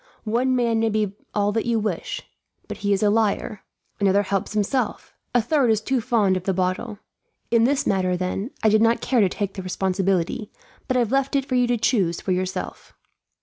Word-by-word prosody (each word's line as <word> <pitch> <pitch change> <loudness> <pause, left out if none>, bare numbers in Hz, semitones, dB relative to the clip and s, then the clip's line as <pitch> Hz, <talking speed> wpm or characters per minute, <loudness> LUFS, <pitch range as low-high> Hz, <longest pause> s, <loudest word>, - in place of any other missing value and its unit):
One 245 +4 +1
man 235 -2 +1
may 225 0 +2
be 210 -2 0 0.2
all 205 0 +2
that 225 +2 -1
you 235 -1 +2
wish, 210 -6 -3 0.4
but - - -6
he 205 -1 -1
is 200 +1 +2
a 205 - +4
liar; 215 -1 0 0.4
another 200 0 +3
helps 195 +1 -2
himself; 215 +5 -1 0.2
a 240 - +4
third 270 0 +2
is 220 -2 +3
too 250 +3 -1
fond 220 -5 +2
of 185 0 -4
the 195 - 0
bottle. 185 +4 -2 0.5
In 230 -1 +4
this 275 +2 +1
matter, 185 -2 +1
then, 185 +5 -3
I 220 - +5
did 215 +1 +4
not 230 +1 +3
care 245 -2 +1
to 195 - +3
take 200 +1 -3
the 190 - -6
responsibility, 190 +1 -1 0.4
but 255 - +1
have 235 -3 +1
left 275 +1 +1
it 275 -1 +1
for 265 - -5
you 250 -1 +3
to 240 0 +1
choose 195 -7 +1
for 190 - -3
yourself." 185 0 -4
215 Hz, 205 wpm, -23 LUFS, 195-235 Hz, 0.5 s, I